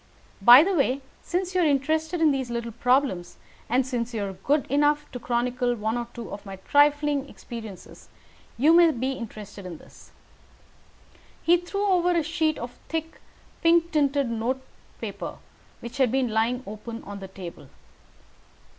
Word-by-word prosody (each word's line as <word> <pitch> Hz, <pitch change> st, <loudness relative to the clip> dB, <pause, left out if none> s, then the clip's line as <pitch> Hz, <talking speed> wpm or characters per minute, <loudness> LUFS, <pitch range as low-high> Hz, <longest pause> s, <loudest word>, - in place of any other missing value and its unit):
By 245 Hz, +7 st, +10 dB
the 390 Hz, +3 st, 0 dB
way, 275 Hz, -4 st, +1 dB, 0.2 s
since 365 Hz, +1 st, -2 dB
you 365 Hz, -, +2 dB
are -, -, +4 dB
interested 315 Hz, +3 st, +1 dB
in 315 Hz, -2 st, +5 dB
these 265 Hz, -3 st, -2 dB
little 235 Hz, 0 st, -3 dB
problems, 240 Hz, -7 st, +1 dB, 0.3 s
and 250 Hz, +2 st, +2 dB
since 245 Hz, -2 st, -3 dB
you 205 Hz, -2 st, -1 dB
are 195 Hz, -, -5 dB
good 275 Hz, +11 st, 0 dB
enough 295 Hz, +2 st, +2 dB
to 250 Hz, -, -6 dB
chronicle 245 Hz, +1 st, 0 dB
one 220 Hz, 0 st, -2 dB
or 240 Hz, -1 st, -3 dB
two 235 Hz, -2 st, -7 dB
of 200 Hz, 0 st, -7 dB
my 195 Hz, -2 st, -8 dB
trifling 290 Hz, +5 st, +2 dB
experiences, 220 Hz, -6 st, -10 dB, 0.5 s
you 295 Hz, +7 st, +5 dB
may 340 Hz, 0 st, +7 dB
be 260 Hz, -2 st, -1 dB
interested 215 Hz, -5 st, -8 dB
in 180 Hz, -3 st, -7 dB
this." -, -, -17 dB, 1.3 s
He 340 Hz, -, +5 dB
threw 395 Hz, +4 st, -3 dB
over 360 Hz, -2 st, +3 dB
a 335 Hz, -2 st, +2 dB
sheet 320 Hz, -1 st, 0 dB
of 240 Hz, +1 st, -8 dB
thick 325 Hz, 0 st, -4 dB, 0.4 s
pink 335 Hz, 0 st, +4 dB
tinted 280 Hz, -3 st, +2 dB
note 240 Hz, +4 st, -2 dB, 0.4 s
paper -, -, -5 dB, 0.5 s
which 235 Hz, +3 st, -8 dB
had 260 Hz, -4 st, +3 dB
been 260 Hz, -2 st, +1 dB
lying 230 Hz, +3 st, 0 dB
open 225 Hz, +3 st, -8 dB
upon 200 Hz, 0 st, -8 dB
the 195 Hz, -, -8 dB
table. 185 Hz, -2 st, -10 dB
260 Hz, 165 wpm, -25 LUFS, 230-305 Hz, 1.3 s, By